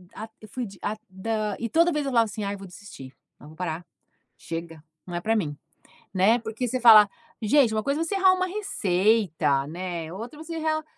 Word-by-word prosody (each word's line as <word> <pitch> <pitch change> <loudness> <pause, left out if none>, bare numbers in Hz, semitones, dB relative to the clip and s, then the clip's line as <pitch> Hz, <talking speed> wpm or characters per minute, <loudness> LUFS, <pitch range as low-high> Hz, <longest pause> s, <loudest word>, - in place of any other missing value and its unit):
a 220 +1 -7
eu 215 - -11
fui 250 +1 -4
de 195 - -12
a 215 +1 -2
da 210 +2 -2
e 230 -1 -3
toda 335 +6 +4
vez 300 -2 -1
eu 270 - -2
falava 230 -2 +4
assim: 215 0 -6
"Ai 200 0 -2
eu - - -10
vou 195 - -9
desistir. 180 -8 -12 0.3
Não, 150 - -14
vou 155 - -14
parar, 175 -1 -4 0.5
chega, 165 -1 -7 0.2
não 175 - -6
é 175 - -2
para 225 +3 +1
mim", 150 -8 -2 0.6
né, 205 +6 +4
porque 225 +2 -4
você 255 - -1
fala: 215 -3 +9 0.3
"Gente, 230 0 +3
uma 215 - 0
coisa 280 +5 -1
é - - +1
você 390 +4 -2
errar 375 -1 +5
uma 370 0 0
receita, 190 - +1
né. 170 0 -5
Outra 235 +9 -8
você 330 +1 -6
errar, 310 -1 -1
215 Hz, 220 wpm, -25 LUFS, 180-255 Hz, 0.6 s, fala